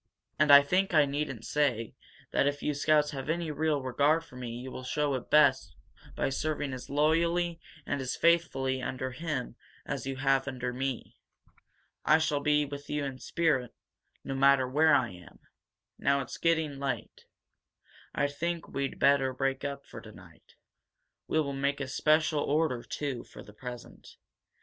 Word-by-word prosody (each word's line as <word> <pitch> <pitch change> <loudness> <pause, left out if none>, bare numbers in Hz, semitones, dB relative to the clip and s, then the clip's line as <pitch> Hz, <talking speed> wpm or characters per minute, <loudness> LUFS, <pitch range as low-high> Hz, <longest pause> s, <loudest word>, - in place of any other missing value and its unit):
And 150 -1 +5
I 140 0 +10
think 185 +4 +1
I 150 -1 +6
needn't 140 -5 -4
say 130 -7 0 0.4
that 140 - +2
if 145 0 -2
you 150 - 0
scouts 150 +1 +2
have 135 0 -6
any 165 -1 -1
real 150 -1 0
regard 145 +5 +2
for 125 - -16
me 125 -1 -6
you 125 +3 -7
will - - -7
show 145 +3 0
it 130 - -4
best 130 - +4 0.4
by - - 0
serving 145 0 -2
as 130 - -8
loyally 165 +3 +1 0.3
and 140 - -2
as 130 - -3
faithfully 135 -6 +2
under 130 0 -3
him 130 -3 -4 0.3
as 135 -2 -4
you 135 - -3
have 135 0 +1
under 125 -2 -3
me. 130 -1 -4 0.9
I 155 - +5
shall 155 -2 0
be 150 0 +2
with 145 0 -8
you 150 -1 -1
in 135 -2 -6
spirit, 135 -8 0 0.5
no 135 - -4
matter 135 -1 +4
where 155 +3 +4
I 120 -6 +1
am. 90 -1 -14 0.6
Now 140 0 +2
it's, 130 - -8
getting 160 -4 +1
late. 135 -5 -4 0.9
I - - +2
think 165 +4 -3
we'd 140 -1 -3
better 135 -2 +3
break 135 +1 -1
up 140 -1 -5
for - - -10
tonight. - - -16 0.7
We 160 - +1
will 140 -3 -1
make 140 +1 -1
a 140 - -3
special 155 +2 +2
order, 145 -4 0
too, 135 -3 -4
for - - -13
the 105 - -15
present. 125 +2 -10
140 Hz, 170 wpm, -29 LUFS, 130-150 Hz, 0.9 s, I